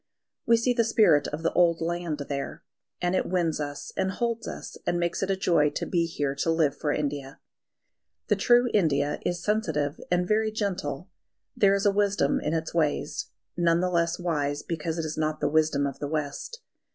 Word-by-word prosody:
We 230 0 +6
see 245 +2 +1
the 235 -1 +2
spirit 210 -10 +4
of 150 +2 -5
the 165 - +1
old 170 -2 +4
land 165 -3 -2
there; 140 -1 -4 0.4
and 175 +1 +1
it - - 0
wins 170 -4 0
us 145 -1 -5
and 190 0 0
holds 230 +3 -2
us, - - -7
and 175 - +1
makes 170 0 -1
it 195 - -1
a 195 - +2
joy 170 -5 +3
to - - -2
be 170 -2 +1
here 145 -4 -2
to 165 - 0
live 160 -4 +2
for 150 - -1
India. 145 -2 -3 0.9
The - - +3
true 245 0 +4
India 150 -7 +2
is 175 -1 -2
sensitive 160 -10 0
and 180 0 +1
very 215 +1 +2
gentle. 190 -5 -3 0.4
There 200 -1 +4
is 200 - -1
a 205 - +5
wisdom 200 -7 +1
in 155 - -1
its 160 0 -3
ways, 155 -3 0 0.3
none 170 -1 +3
the 180 0 0
less 170 -1 +1
wise 145 -5 -1
because 165 0 -3
it 165 - -2
is 155 0 -4
not 155 0 -1
the - - +1
wisdom 155 -2 +2
of 140 -2 -4
the 145 - -3
West. 160 - -4
170 Hz, 200 wpm, -27 LUFS, 150-195 Hz, 0.9 s, We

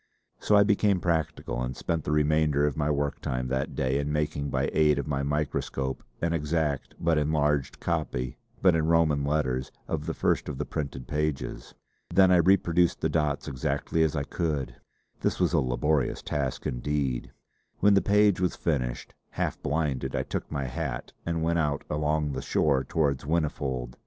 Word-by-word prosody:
So 105 - +3
I 100 - +7
became 100 -2 +3
practical, 80 -7 -1
and 60 0 -3
spent 80 -2 -2
the - - -1
remainder 75 -1 +3
of 75 -3 0
my 75 0 0
work 70 -1 -1
time 65 0 -2
that 65 +1 -2
day 65 +1 +1
in 70 +1 -2
making 75 -1 -1
by - - 0
aid 75 -2 +4
of 70 - -2
my 70 -2 -1
microscope 70 -2 -2 0.2
an 85 0 +1
exact 75 -2 -1
but 80 -2 +2
enlarged 75 -2 0
copy, 75 -7 -2 0.2
but 95 -2 +6
in 80 -1 +1
Roman 80 -4 +3
letters, 70 -3 0 0.2
of 80 -1 -3
the 80 - -2
first - - 0
of 70 - -5
the - - -2
printed 70 -5 -5
pages. 75 -1 -3 0.3
Then 95 -1 +5
I 90 - +6
reproduced 90 -1 +3
the - - +1
dots 75 -2 0
as - - -2
exactly 70 +4 -1
as 80 -1 +2
I 70 - 0
could. 75 -3 -2 0.5
This - - -1
was - - +2
a - - +4
laborious 65 +3 0
task 70 -4 -2
indeed. 65 0 -2 0.5
When 100 +1 +5
the 100 - +5
page 105 -2 +4
was 90 - +1
finished, 65 -7 -2 0.2
half - - -3
blinded, 70 -4 -1
I - - 0
took - - -5
my 70 - -2
hat - - -4
and 85 -1 -1
went 85 +1 +1
out 75 -2 0
along 75 0 0
the 65 -1 -3
shore 70 -4 +2
towards 70 -1 0
Whinnyfold. 70 -6 -2
75 Hz, 180 wpm, -27 LUFS, 70-80 Hz, 0.5 s, I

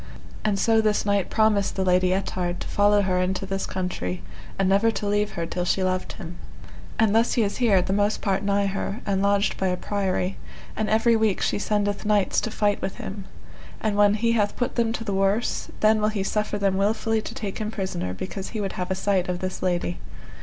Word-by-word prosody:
And 210 -2 +1
so 225 +2 +3
this 215 -1 +1
knight 200 -2 +1
promised 215 -3 +2
the 190 - 0
Lady 180 0 +3
Ettard 180 -2 -1
to - - -5
follow 205 0 +3
her 180 -1 +1
into 190 +1 -1
this 195 0 -3
country, 90 - -3 0.3
and 195 - +2
never 200 +4 +4
to 215 -2 -3
leave 205 +1 0
her 170 -2 -2
till 180 +2 -3
she 190 +1 +1
loved 185 0 -1
him. 175 -3 -9 0.6
And 220 -2 +3
thus 225 +2 +3
he 235 - +2
is 200 - -2
here 205 -7 +3
the 190 - -1
most 205 +1 +1
part 195 -3 0
nigh 200 0 +1
her, 195 +3 -3
and 195 -1 0
lodged 200 +1 +2
by 190 - 0
a 180 0 0
priory, 190 -1 -1 0.4
and 215 0 -1
every 225 +2 +4
week 220 -3 +2
she - - 0
sendeth 205 -1 -1
knights 210 -2 +2
to - - -2
fight 210 -1 0
with 190 - -3
him. 195 0 -7 0.5
And 215 -2 -1
when 205 0 +5
he 230 +2 +1
hath 210 -3 +1
put 245 - -1
them 230 -2 +1
to 230 - -4
the 205 -3 -3
worse, 195 +4 0
then 215 0 +4
will 210 - +3
he 210 -3 -2
suffer 210 +1 -1
them 195 -2 +1
wilfully 220 +2 +1
to - - -8
take 205 -3 -5
him 215 -1 -2
prisoner, 190 - -3
because 190 - -5
he 220 - -4
would 195 -2 -2
have 180 - -4
a 190 - 0
sight 190 -1 0
of 180 - -1
this 185 +1 -4
lady. 175 -1 -1
200 Hz, 225 wpm, -24 LUFS, 190-215 Hz, 0.6 s, when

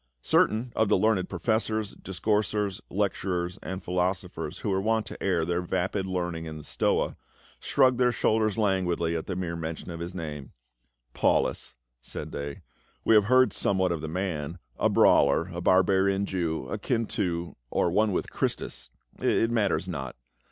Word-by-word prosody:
Certain 115 +3 +2
of 110 -2 +2
the - - +4
learned 105 -1 +2
professors, 110 +2 0
discoursers, 105 +1 -1
lecturers 90 -3 -1
and 95 +1 -5
philosophers 90 +1 -2
who 105 - -2
were 95 0 +1
wont 110 +1 +1
to - - -8
air 90 -4 +1
their 90 +1 0
vapid 95 +2 -1
learning 85 -3 -2
in 80 -1 -6
the 75 - -9
Stoa, - - 0 0.4
shrugged 130 -2 +3
their 125 -1 +4
shoulders 110 -2 +1
languidly 90 -5 +1
at 80 - -4
the 95 - -2
mere 85 -2 -3
mention 80 +1 -5
of 85 - -6
his 85 +2 -6
name, 75 -6 -6 0.3
" - - -47
Paulus," - - +1 0.3
said - - -7
they, 70 0 -6 0.2
" - - -38
we - - +5
have 105 -2 +6
heard 130 +3 +4
somewhat 95 -2 +1
of 85 -3 -2
the 80 - -4
man, 85 -2 -3 0.2
a - - +3
brawler, 80 +6 +4
a 85 - -4
barbarian 95 +2 +3
Jew, 80 -8 -2
akin 115 -1 -1
to, 85 -4 -2
or 85 - +1
one 105 +3 +3
with 90 - -2
Christus - - -3
— - - -29
it 115 - +2
matters 105 -5 +1
not. 70 -8 -5
95 Hz, 170 wpm, -27 LUFS, 85-105 Hz, 0.4 s, have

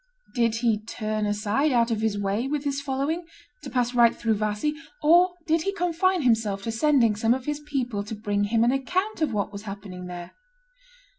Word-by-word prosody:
Did 235 -3 +2
he 225 -2 +1
turn 215 -1 -2
aside 210 +8 +1
out 235 -1 +2
of 220 -1 -1
his 220 -2 0
way 205 +5 -1
with 290 0 -2
his 280 -1 -1
following, 285 +5 -2 0.3
to - - -7
pass 245 -1 0
right 235 -1 +5
through 225 -1 0
Vassy, 215 +7 -1 0.3
or 350 +4 +5
did 325 -1 +2
he 395 +4 -1
confine 355 -1 +1
himself 220 -5 +1
to 225 - -2
sending 230 -2 +3
some 225 +3 +2
of 260 -1 -7
his 295 0 -2
people 255 -8 -3
to 220 - -5
bring 205 -1 -1
him 225 +2 +2
an 240 - +4
account 360 +9 -1
of 305 -5 +1
what 210 -1 -1
was 200 - -6
happening 195 -3 -8
there? 175 0 -7
235 Hz, 200 wpm, -25 LUFS, 210-295 Hz, 0.3 s, right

